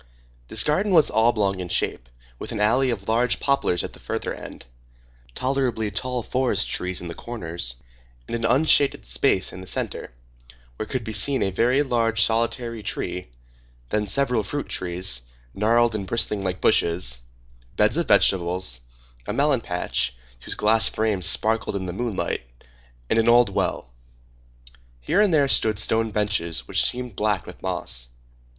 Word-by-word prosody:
This 110 - +2
garden 190 +7 +1
was 160 -4 +5
oblong 105 -4 +2
in 90 -1 -5
shape, - - -1 0.3
with - - -6
an - - -4
alley 125 +6 +3
of 100 -5 -3
large 115 +2 +2
poplars 140 -11 +1
at - - -6
the - - -14
further - - -4
end, - - -10 0.7
tolerably 125 -5 -1
tall 125 +4 -2
forest 130 +2 +1
trees 90 0 -3
in 90 - -6
the 85 - -6
corners, 85 - -4 0.5
and - - -3
an 115 - -3
unshaded 140 +4 +3
space 60 +10 +1
in 90 - -8
the 95 - -11
centre, - - -3 0.7
where 110 - -4
could 130 -3 -3
be 110 - -5
seen 130 +6 +3
a 95 - -1
very 125 +8 +2
large, 115 -4 0
solitary 115 0 -1
tree, 90 -2 -4 0.6
then 105 -1 -1
several 125 +2 +2
fruit 145 +8 -4
trees, 90 -9 -1 0.3
gnarled 115 +3 +2
and 100 -3 -4
bristling 105 -1 0
like 95 -1 -3
bushes, 85 -8 +2 0.6
beds 105 +3 +3
of 170 -2 0
vegetables, 90 - +2 0.5
a - - -2
melon 140 -3 +2
patch, 90 - -1 0.3
whose - - 0
glass 110 +1 +4
frames 105 -5 0
sparkled 110 +1 +1
in 95 -1 -3
the 90 - -5
moonlight, 115 - -2 0.7
and 115 - +2
an 115 +1 +3
old 120 -2 +5
well. 95 -10 -2 1.1
Here 120 - +1
and 210 -3 +3
there 145 -4 +3
stood 110 -5 +2
stone 110 +1 +1
benches 85 - -1
which - - +3
seemed 125 -4 -1
black 105 -2 0
with - - -11
moss. - - -2
110 Hz, 160 wpm, -23 LUFS, 95-120 Hz, 1.1 s, was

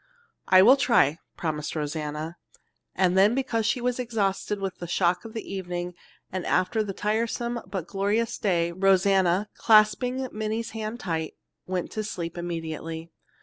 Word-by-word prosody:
"I 185 0 +7
will 255 +6 +8
try," 170 - +3 0.2
promised 150 -2 -3
Rosanna, 150 +1 -4 0.6
and 185 -1 +2
then 200 +5 +5
because 230 -4 0
she 250 - +1
was 245 +1 -1
exhausted 210 -4 -1
with 195 -1 -4
the 175 - -5
shock 175 +3 +1
of 225 - -8
the 225 - -5
evening 180 -2 -4 0.4
after 185 +3 +1
the 210 -2 -2
tiresome 230 +4 -1
but 190 -5 -4
glorious 205 +5 -1
day 170 -4 +1
Rosanna, 190 +1 +3
clasping 230 +4 +3
Minnie's 220 +1 -3
hand 220 +2 -5
tight, 160 -4 -3 0.3
went 180 -1 -2
to 215 - -3
sleep 170 -5 -5
immediately. 165 -1 -5
195 Hz, 145 wpm, -26 LUFS, 170-220 Hz, 0.6 s, will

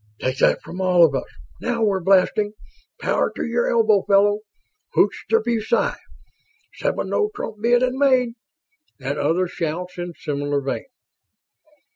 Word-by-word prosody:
"Take 130 +1 -2
that - - +3
from 180 +2 -7
all 180 -2 +5
of 150 - 0
us!" 135 - -2 0.3
"Now 235 -1 -1
we're 200 -3 +2
blasting!" 195 +3 +2 0.5
"Power - - +1
to - - -3
your 235 0 0
elbow, 220 -4 +3
fella!" 205 +1 +3 0.6
"Hoch - - +4 0.2
der 455 0 +3
BuSci!" 230 0 0 0.8
"Seven - - -2
no 420 - +1
trump 225 - -5
bid 240 +2 +3
and 255 +1 0
made!" 255 -4 +3 0.7
and 140 +2 -3
other 170 +5 +1
shouts 175 +2 -4
in 175 0 -5
similar 145 0 -2
vein. 135 -1 -4
195 Hz, 145 wpm, -22 LUFS, 170-235 Hz, 0.8 s, all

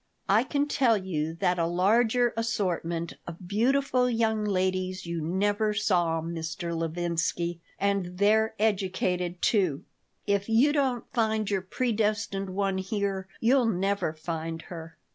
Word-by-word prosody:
I 210 +4 +4
can 285 +2 0
tell 255 -6 +3
you 165 -5 -3
that 180 +1 +1
a 165 - +2
larger 225 +7 +3
assortment 175 -7 -1
of 170 +1 -8
beautiful 250 +4 +2
young 225 -2 +1
ladies 185 -1 -1
you 170 -1 -3
never 205 +6 0
saw, 175 -6 +1
Mr. 165 +1 -4
Levinsky. 170 +1 -1 0.2
And 195 -3 0
they're 220 +3 +3
educated, 185 -4 0
too. 185 -10 +2 0.4
If 200 +1 0
you 250 +7 +4
don't 265 -5 0
find 220 -3 +1
your 195 -2 +1
predestined 210 -2 -1
one 195 0 -1
here 195 -1 -2
you'll 245 +1 +3
never 195 -3 0
find 165 +1 -5
her. 165 -1 -9
195 Hz, 130 wpm, -28 LUFS, 175-220 Hz, 0.4 s, I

